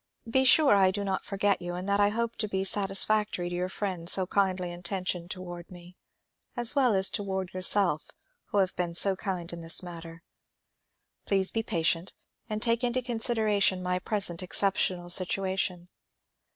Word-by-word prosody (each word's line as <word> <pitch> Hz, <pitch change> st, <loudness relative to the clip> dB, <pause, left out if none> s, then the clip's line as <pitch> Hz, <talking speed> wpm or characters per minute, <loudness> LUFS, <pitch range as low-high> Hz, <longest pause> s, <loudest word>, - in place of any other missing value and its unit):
Be 265 Hz, +3 st, +2 dB
sure 280 Hz, +1 st, +6 dB
I 195 Hz, -2 st, +4 dB
do 200 Hz, +2 st, -3 dB
not 190 Hz, -1 st, -2 dB
forget 200 Hz, 0 st, 0 dB
you 175 Hz, 0 st, -5 dB
and 180 Hz, +2 st, -6 dB
that 200 Hz, 0 st, +1 dB
I 205 Hz, 0 st, +4 dB
hope 230 Hz, +2 st, -3 dB
to 215 Hz, -, -2 dB
be 190 Hz, -1 st, -2 dB
satisfac 205 Hz, +2 st, +2 dB
tory 175 Hz, -3 st, -4 dB
to 175 Hz, -, -5 dB
your 180 Hz, +1 st, -2 dB
friend 185 Hz, -4 st, -3 dB
so 190 Hz, -1 st, +6 dB
kindly 185 Hz, -2 st, 0 dB
intentioned 175 Hz, 0 st, -4 dB
toward 175 Hz, -2 st, -8 dB
me 175 Hz, 0 st, -14 dB, 0.6 s
as 240 Hz, +1 st, +1 dB
well 255 Hz, -6 st, +3 dB
as 190 Hz, 0 st, +3 dB
toward 190 Hz, -2 st, -3 dB
yourself 185 Hz, -3 st, +2 dB, 0.4 s
who -, -, -4 dB
have 190 Hz, -2 st, +1 dB
been 175 Hz, -1 st, -3 dB
so 195 Hz, +2 st, +5 dB
kind 180 Hz, -3 st, -5 dB
in 170 Hz, -, -7 dB
this 165 Hz, +2 st, -1 dB
matter. 165 Hz, -1 st, -10 dB, 1.0 s
Please 195 Hz, -1 st, 0 dB
be 225 Hz, -, -1 dB
patient 165 Hz, -2 st, -1 dB, 0.3 s
and 215 Hz, 0 st, -3 dB
take 230 Hz, 0 st, +1 dB
into 250 Hz, +1 st, -1 dB
consideration 220 Hz, -5 st, +1 dB
my 180 Hz, 0 st, -1 dB
present 185 Hz, -3 st, +1 dB
exceptional 185 Hz, -1 st, 0 dB
situation. 185 Hz, -1 st, 0 dB
190 Hz, 170 wpm, -28 LUFS, 175-205 Hz, 1.0 s, sure